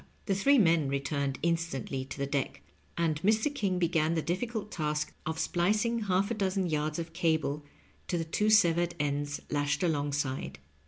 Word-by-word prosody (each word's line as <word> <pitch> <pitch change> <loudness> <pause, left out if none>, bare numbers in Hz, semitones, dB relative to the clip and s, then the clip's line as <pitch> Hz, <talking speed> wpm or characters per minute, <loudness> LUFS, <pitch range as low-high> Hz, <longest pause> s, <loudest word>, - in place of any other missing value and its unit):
The 195 - +1
three 275 +9 +4
men 165 - +4
returned 140 0 -1
instantly 165 -6 -1
to 135 +1 -5
ihe 140 - -4
deck, 140 -2 -2 0.3
and 160 -3 0
Mr. 220 - +2
King 200 -9 0
began 165 -2 +1
the 160 - 0
diflScult 215 +4 -3
task 150 -2 -2
of 160 0 -2
splicing 210 +7 +1
half 195 +2 +1
a - - +2
dozen 195 -3 0
yards 155 -2 -1
of 165 -1 -5
cable 160 -3 0 0.4
to 175 - 0
the 165 - -2
two 210 +6 +1
severed 175 -4 +4
ends 145 0 -2
lashed 145 0 0
alongside. 145 - -1
165 Hz, 165 wpm, -30 LUFS, 145-190 Hz, 0.4 s, three